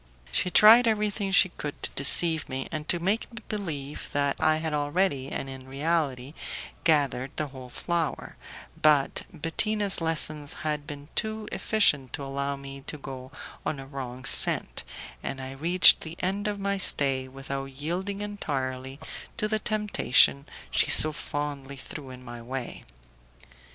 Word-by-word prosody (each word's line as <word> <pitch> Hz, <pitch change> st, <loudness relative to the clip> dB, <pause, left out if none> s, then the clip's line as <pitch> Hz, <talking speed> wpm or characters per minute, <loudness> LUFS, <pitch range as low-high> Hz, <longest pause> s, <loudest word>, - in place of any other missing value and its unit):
She 180 Hz, -, +1 dB
tried 225 Hz, +6 st, +8 dB
everything 210 Hz, -2 st, 0 dB
she 190 Hz, -1 st, +6 dB
could 150 Hz, -4 st, -7 dB
to -, -, +1 dB
deceive 160 Hz, +3 st, +3 dB
me, 130 Hz, 0 st, -4 dB
and 155 Hz, -1 st, -5 dB
to 175 Hz, -, +3 dB
make 195 Hz, +9 st, -1 dB
me 230 Hz, -2 st, -10 dB
believe 150 Hz, -9 st, -5 dB
that 140 Hz, -1 st, +1 dB
I 155 Hz, 0 st, +3 dB
had 160 Hz, -1 st, -3 dB
already, 145 Hz, -1 st, 0 dB
and -, -, -4 dB
in 130 Hz, -1 st, -9 dB
reality, 140 Hz, -2 st, -1 dB, 0.5 s
gathered 140 Hz, -5 st, +2 dB
the 150 Hz, -2 st, -2 dB
whole 130 Hz, -2 st, -11 dB
flower, 170 Hz, +3 st, -3 dB, 0.5 s
but 150 Hz, -3 st, +3 dB
Bettina's 195 Hz, +5 st, +2 dB
lessons 155 Hz, -3 st, +1 dB
had 150 Hz, -1 st, -2 dB
been 145 Hz, 0 st, -9 dB
too 220 Hz, 0 st, -2 dB
efficient 150 Hz, -, +1 dB
to 140 Hz, -, -4 dB
allow 140 Hz, +1 st, -3 dB
me 140 Hz, 0 st, -9 dB
to 150 Hz, -, -2 dB
go 130 Hz, -2 st, -9 dB, 0.3 s
on 145 Hz, -, -3 dB
a 135 Hz, -, -8 dB
wrong 130 Hz, -2 st, -7 dB
scent, -, -, +5 dB, 0.4 s
and 135 Hz, -, -5 dB
I 130 Hz, 0 st, -6 dB
reached 170 Hz, +7 st, +5 dB
the 160 Hz, +1 st, -8 dB
end 195 Hz, +3 st, -2 dB
of 205 Hz, -1 st, -3 dB
my 200 Hz, 0 st, -1 dB
stay 135 Hz, -7 st, +2 dB
without 135 Hz, +1 st, -6 dB
yielding 175 Hz, +9 st, -4 dB
entirely 135 Hz, -9 st, -4 dB, 0.4 s
to 210 Hz, -, 0 dB
the 215 Hz, 0 st, 0 dB
temptation 195 Hz, -, +3 dB, 0.2 s
she -, -, +2 dB
so 155 Hz, -, +7 dB
fondly 145 Hz, -2 st, -5 dB
threw 135 Hz, +1 st, -8 dB
in 125 Hz, 0 st, -11 dB
my 120 Hz, -1 st, -8 dB
way. 125 Hz, +1 st, -6 dB
145 Hz, 155 wpm, -27 LUFS, 135-185 Hz, 0.5 s, tried